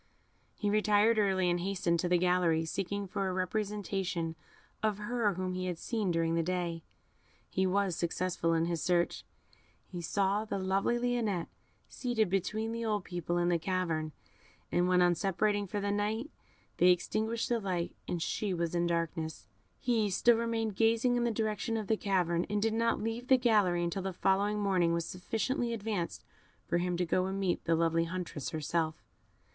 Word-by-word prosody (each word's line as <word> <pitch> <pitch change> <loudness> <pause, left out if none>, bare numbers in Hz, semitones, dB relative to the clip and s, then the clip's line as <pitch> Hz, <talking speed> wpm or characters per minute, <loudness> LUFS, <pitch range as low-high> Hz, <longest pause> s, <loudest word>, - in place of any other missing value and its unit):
He 205 -1 -1
retired 215 +1 +4
early, 190 -3 +2
and 175 0 +2
hastened 175 -2 0
to 175 - 0
the 180 - +4
gallery, 175 -2 +2
seeking 200 +4 -3
for 195 0 -2
a - - -1
representation 190 -3 -2 0.5
of 215 -2 +1
her 210 -2 0
whom 185 0 -2
he 185 0 -3
had 175 -2 -3
seen 215 0 -2
during 165 -1 +1
the 165 - +2
day 170 -1 -2 0.7
he 190 0 +1
was 195 -1 +1
successful 170 -1 0
in 165 0 +2
his 170 -1 -2
search; 175 -1 +1 0.6
he 175 -2 -7
saw 200 +4 +1
the 215 - -3
lovely 195 +5 +1
Lionette 235 -7 -1 0.4
seated 225 -7 -1
between 215 +4 -1
the 230 0 -3
old 210 -3 0
people 175 -1 -3
in 175 0 +2
the 170 -1 +2
cavern, 165 -3 -1 0.6
and 175 +1 +2
when, 180 0 +4
on 175 0 +4
separating 200 +3 0
for 205 - -3
the 200 0 -1
night, 215 +7 -1 0.5
they 180 - +6
extinguished 220 +6 +1
the 240 -1 +2
light, 180 -4 -2
and 170 -2 -2
she 200 -4 -1
was 170 -1 -1
in 175 0 +1
darkness, 165 -2 -2 0.3
he 225 -4 +1
still 235 +5 +4
remained 225 -2 -1
gazing 230 +3 +3
in 240 0 +1
the - - +2
direction 220 0 -1
of 215 - -3
the 220 - +2
cavern, 180 -5 +1
and 210 - 0
did 220 +1 +1
not 230 +1 +1
leave 225 +3 -3
the 260 - +6
gallery 205 -8 +3
until 170 +3 -2
the 190 0 -3
following 200 +4 +1
morning 185 -4 +2
was 170 0 -1
sufficiently 230 +7 -2
advanced 205 -5 -3 0.4
for 170 - +1
him 180 0 -1
to 180 - +1
go 185 +2 +1
and 195 +1 -3
meet 190 -3 0
the 165 - +3
lovely 165 0 +2
huntress 170 -5 -4
herself. 160 +1 -1
190 Hz, 180 wpm, -31 LUFS, 175-215 Hz, 0.7 s, they